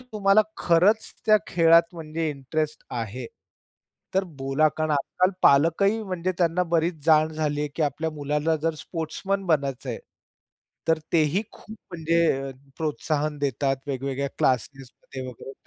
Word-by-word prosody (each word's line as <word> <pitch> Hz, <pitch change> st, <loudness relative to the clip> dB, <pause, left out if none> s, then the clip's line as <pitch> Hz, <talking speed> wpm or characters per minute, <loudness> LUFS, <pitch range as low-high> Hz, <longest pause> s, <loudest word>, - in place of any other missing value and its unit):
तुम्हाला 215 Hz, -4 st, +3 dB, 0.2 s
खरंच 185 Hz, +6 st, +3 dB
त्या 215 Hz, -, +7 dB
खेळात 165 Hz, 0 st, +5 dB
म्हणजे 160 Hz, -1 st, -3 dB
इंटरेस्ट 150 Hz, +2 st, -3 dB
आहे, 120 Hz, +1 st, -4 dB, 0.9 s
तर 190 Hz, 0 st, +2 dB, 0.2 s
बोला. 135 Hz, +3 st, +2 dB
कारण 155 Hz, -1 st, -1 dB
आजकाल 180 Hz, +6 st, +1 dB
पालकही 170 Hz, +10 st, +4 dB
म्हणजे 185 Hz, -2 st, -2 dB
त्यांना 175 Hz, 0 st, +2 dB
बरीच 160 Hz, -2 st, 0 dB
जाण 155 Hz, 0 st, +5 dB
झाली 150 Hz, -2 st, -1 dB
आहे, 150 Hz, -, -1 dB
की 160 Hz, -, 0 dB
आपल्या 155 Hz, +3 st, -1 dB
मुलाला 150 Hz, +2 st, -1 dB
जर 165 Hz, -1 st, 0 dB
स्पोर्ट्समन 190 Hz, +4 st, -3 dB
बनायचंय, 140 Hz, -6 st, -1 dB, 0.9 s
तर 160 Hz, -1 st, +4 dB
तेही 165 Hz, +5 st, +2 dB
खूप 220 Hz, +1 st, -12 dB, 0.2 s
म्हणजे 165 Hz, -4 st, +1 dB, 0.3 s
प्रोत्साहन 150 Hz, -1 st, -2 dB
देतात 140 Hz, -1 st, 0 dB
वेगवेगळ्या 135 Hz, 0 st, -2 dB
क्लासेसमध्ये 130 Hz, +1 st, -2 dB
वगैरे. 125 Hz, +2 st, -9 dB
155 Hz, 125 wpm, -25 LUFS, 140-170 Hz, 0.9 s, त्या